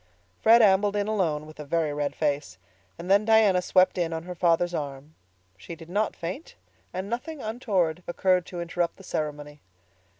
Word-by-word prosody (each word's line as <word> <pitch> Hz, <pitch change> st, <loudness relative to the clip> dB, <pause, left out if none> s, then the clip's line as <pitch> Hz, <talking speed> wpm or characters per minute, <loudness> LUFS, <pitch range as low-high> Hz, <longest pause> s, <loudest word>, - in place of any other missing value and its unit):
Fred 230 Hz, +1 st, +7 dB
ambled 200 Hz, 0 st, +4 dB
in 205 Hz, 0 st, 0 dB
alone, 170 Hz, -8 st, 0 dB
with 155 Hz, 0 st, -14 dB
a -, -, -5 dB
very 155 Hz, 0 st, -1 dB
red 145 Hz, -1 st, -2 dB
face, 145 Hz, -, -2 dB, 0.4 s
and 175 Hz, -, -8 dB
then 200 Hz, +2 st, +4 dB
Diana 215 Hz, -4 st, +4 dB
swept 185 Hz, 0 st, +3 dB
in 165 Hz, -1 st, -1 dB
on 160 Hz, 0 st, -4 dB
her 180 Hz, +1 st, -7 dB
father's 175 Hz, 0 st, +1 dB
arm. 145 Hz, -1 st, -5 dB, 0.4 s
She 95 Hz, -, -9 dB
did 165 Hz, 0 st, -13 dB
not 210 Hz, +2 st, 0 dB
faint, 180 Hz, -, -7 dB, 0.4 s
and 185 Hz, +2 st, -4 dB
nothing 250 Hz, +8 st, -5 dB
untoward 200 Hz, -8 st, -1 dB
occurred 180 Hz, 0 st, +1 dB
to 175 Hz, -1 st, -6 dB
interrupt 170 Hz, 0 st, -2 dB
the 195 Hz, -, -14 dB
ceremony. 150 Hz, -3 st, -5 dB
175 Hz, 175 wpm, -26 LUFS, 155-200 Hz, 0.4 s, Fred